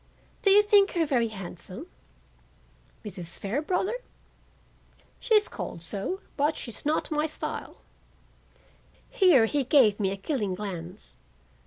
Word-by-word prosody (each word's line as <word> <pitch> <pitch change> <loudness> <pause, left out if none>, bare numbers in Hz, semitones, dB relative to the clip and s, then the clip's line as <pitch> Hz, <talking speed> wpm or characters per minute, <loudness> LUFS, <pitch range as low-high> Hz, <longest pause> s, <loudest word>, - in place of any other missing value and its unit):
Do 395 - +3
you 410 +2 +7
think 410 -1 +4
her 335 -2 +2
very 250 -6 +1
handsome?" 195 - -8 1.2
"Mrs. 180 -4 -2
Fairbrother? 305 - -1 1.3
She's 425 -3 +3
called 170 - -7
so, 205 - -4 0.2
but 295 +2 +1
she's 235 +4 -5
not 310 +1 0
my 305 +1 +1
style." 310 - -6 1.3
Here 330 - +5
he 280 +5 0
gave 240 -6 +4
me 195 -2 +1
a 195 - -4
killing 205 -4 -2
glance. 185 -1 -7
260 Hz, 120 wpm, -27 LUFS, 195-325 Hz, 1.3 s, you